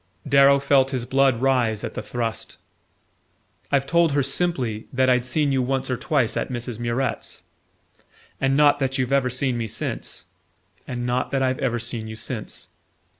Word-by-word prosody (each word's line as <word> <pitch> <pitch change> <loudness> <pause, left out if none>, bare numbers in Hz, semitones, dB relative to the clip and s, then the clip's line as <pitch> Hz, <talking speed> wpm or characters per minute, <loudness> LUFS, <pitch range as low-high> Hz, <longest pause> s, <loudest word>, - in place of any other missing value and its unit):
Darrow 140 0 +6
felt 135 -1 +3
his 130 -3 -3
blood 135 -1 +2
rise 120 -5 +2
at 115 - -4
the - - -4
thrust. 115 -2 -4 1.1
"I've 140 -1 +2
told 165 +1 +3
her, 140 -1 +2
simply, 130 -7 0
that 130 0 +3
I'd 125 0 +1
seen 145 +1 +1
you 135 -1 +2
once 130 +1 -1
or - - +1
twice 130 -2 0
at - - -2
Mrs. 120 -2 -5
Murrett's." 120 +3 -2 1.0
"And 135 0 +2
not 145 -1 +5
that 135 -1 -1
you've 130 0 -1
ever 135 -2 +3
seen 130 -1 0
me 115 - -2
since?" 90 - -3 0.6
"And 120 -1 -4
not 125 +1 0
that 135 -1 0
I've 130 +1 0
ever 125 -4 0
seen 115 -1 -4
you 110 - -7
since..." - - -6
130 Hz, 175 wpm, -23 LUFS, 120-140 Hz, 1.1 s, Darrow